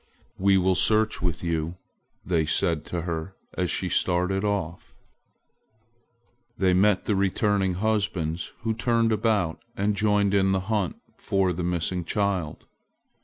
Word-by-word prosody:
"We 95 0 +4
will 95 0 +3
search 110 +3 +2
with 85 -4 -2
you," 85 0 -2 0.5
they 80 -4 +1
said 80 0 +1
to 85 -2 -4
her 85 +2 -4 0.2
as 90 -2 -1
she 95 - -1
started 90 +2 +1
off. 100 -5 -3 1.6
They 95 -1 +3
met 95 +1 +3
the 105 - +1
returning 100 0 +1
husbands, 95 -6 -1
who 115 0 -1
turned 115 0 +1
about 105 -6 0 0.2
and 100 +2 +1
joined 105 -1 +2
in 95 -1 +3
the 95 - +1
hunt 100 -2 -1 0.2
for 95 -2 0
the 90 +1 -4
missing 90 +1 -1
child. 95 -4 -2
95 Hz, 135 wpm, -25 LUFS, 85-105 Hz, 1.6 s, We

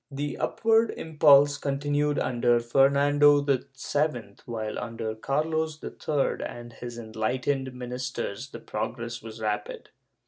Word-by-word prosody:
* - - -54
The 145 0 -2
upw^ard 225 0 +2
impulse 145 -2 +5
continued 145 +1 0
under 120 -1 +2
Fernando 140 +4 +4
VII, 140 -2 +1 0.8
while, 110 -2 -4
under 115 -2 -4
Carlos 155 +6 -1
III 145 -3 -1
and 120 0 -8
his 120 -1 -8
enlightened 125 +4 -2
ministers 125 -1 -5
the - - -9
progress 115 +2 -4
was 110 0 -9
rapid. 105 -1 -3
130 Hz, 115 wpm, -27 LUFS, 115-145 Hz, 0.8 s, impulse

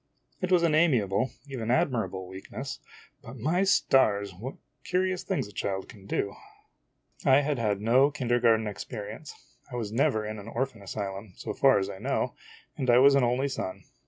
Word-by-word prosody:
86 - - -34
IMAGINOTIONS 185 - -1
It - - +2
was 170 - +2
an 165 -2 +3
amiable, 130 - +3 0.2
even 125 -5 -5
admirable, 100 -8 0
weakness 95 +1 -7 0.4
but, 120 +4 -10
my 160 - +1
stars! 105 - +3
what 115 +9 -7 0.3
curious 185 0 0
things 190 - -2
a - - -13
child 95 -1 -3
can 100 -2 -14
do! 100 -1 -1 0.9
I 140 -3 +6
had 145 -2 -1
had 105 -3 0
no 125 +6 +5
kindergarten 120 -5 +2
experience. 105 +5 -7 0.4
I - - -5
was 110 -4 -3
never 115 -2 +1
in 110 0 -5
an 100 - -10
or 130 +3 0
phan 115 -6 -16
asylum, 100 0 -5
so - - -5
far 135 -4 +5
as 95 -1 0
I 95 - -7
know, - - -1 0.4
and 130 - -2
I 120 - +7
was 140 +2 +7
an 135 -2 +4
only 125 +3 +1
son. 110 -8 -5
120 Hz, 190 wpm, -28 LUFS, 100-140 Hz, 0.9 s, I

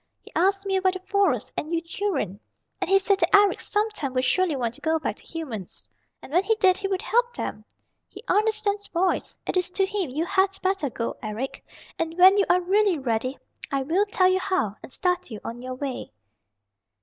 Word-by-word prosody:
He - - -14
asked 390 +3 +2
me 385 -1 +1
about 375 0 +2
the 375 - -5
Forest 400 +1 +1
and 310 - -4
you - - +2
children. 330 - -3 0.4
And 375 - -1
he 390 - +6
said 390 0 +2
that 340 +2 +4
Eric 405 0 +5
sometime 415 -10 -2
would 255 0 +1
surely 365 +2 +2
want 240 -3 -1
to - - -13
go 320 +1 +1
back 315 - -3
to - - -13
humans, 255 - -7 0.4
and 280 - -11
when 360 +3 +4
he 445 +2 +2
did 380 -4 +4
he 400 - -2
would 385 +1 -2
help 480 +1 +1
him. - - -4 0.5
He - - -12
understands 420 -1 +1
boys. 360 +2 0
It - - -1
is 360 - +1
to 385 +2 +1
him 385 -5 -2
you 305 +6 -2
had 385 +1 +1
better 375 -6 0
go, 230 -1 -4
Eric, 220 +5 -5 0.4
and 330 +1 -2
when 375 +2 +8
you 400 - +4
are 360 +1 +4
really 390 0 +2
ready 255 0 -1 0.3
I 275 -1 0
will 360 +9 +1
tell 375 -2 +3
you 370 0 +3
how, 370 - -1
and - - -11
start 360 +3 -1
you 215 -3 -7
on 235 +1 -6
your 255 0 -5
way." 265 - -5
365 Hz, 210 wpm, -25 LUFS, 275-395 Hz, 0.5 s, when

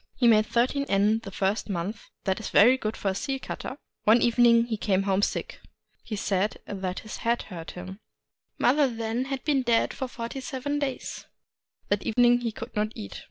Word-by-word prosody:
He 245 - +3
made 215 -2 +5
thirteen 260 +4 +1
yen 205 +3 +3
the 225 - -9
first 195 +3 -1
month; 195 +3 -4
— - - -57
that 190 -1 0
is 220 - -5
very 240 +6 +6
good 220 -4 -3
for 200 - -1
a - - 0
seal 270 +7 -2
cutter. 260 - -6 0.3
One 225 +3 +5
evening 235 -1 +5
he 235 -2 -2
came 195 -2 +1
home 195 0 +1
sick: - - -2 0.4
he 215 - -5
said 200 0 0
that 190 -2 -4
his 215 - -7
head 235 +1 0
hurt 170 -5 -8
him. 185 +2 -8 0.6
Mother 280 +3 +4
had 230 - -8
then 230 +3 -1 0.2
been 285 -3 +2
dead 235 -2 +2
forty 250 0 -5
seven 280 +3 -3
days. 275 -3 -4 0.6
That 205 0 +1
evening 245 +1 +3
he 235 -2 -1
could - - -9
not 215 +1 0
eat. 100 -1 -7
225 Hz, 195 wpm, -27 LUFS, 200-245 Hz, 0.6 s, very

